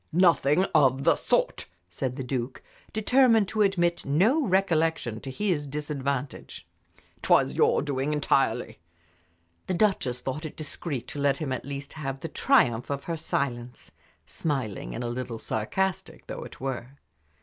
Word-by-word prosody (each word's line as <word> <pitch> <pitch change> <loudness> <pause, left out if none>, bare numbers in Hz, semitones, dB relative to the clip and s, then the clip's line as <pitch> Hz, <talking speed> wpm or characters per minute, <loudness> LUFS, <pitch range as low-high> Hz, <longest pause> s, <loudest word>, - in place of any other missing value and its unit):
"Nothing 170 -1 +4
of 135 -4 +4
the - - +5
sort," - - 0 0.2
said 125 +9 -3
the 135 - -4
Duke, 125 0 -4 0.3
determined 225 -1 +4
to 215 - 0
admit 175 -4 +2
no 205 - +3
recollection 165 - +1
to 135 - -7
his 155 -1 -1
disadvantage. 140 -2 -4 0.5
"It - - -8
was - - +5
your - - +3
doing 140 0 -1
entirely." 145 - +1 0.9
The 185 - 0
Duchess 160 - +1
thought 135 +5 -4
it 155 - -6
discreet 145 -4 -5
to 145 - -6
let 140 -1 +2
him 150 -5 -3
at 130 - -3
least 140 0 -6
have 135 -3 -5
the 165 - -4
triumph 125 - +2
of 140 -1 -3
her 170 - -3
silence, 125 -6 -3 0.3
smiling, 120 - -3
and - - -4
a - - -2
little 120 -1 -4
sarcastic 180 - -2
though - - -6
it - - -12
were. 130 0 -5
140 Hz, 150 wpm, -27 LUFS, 130-170 Hz, 0.9 s, the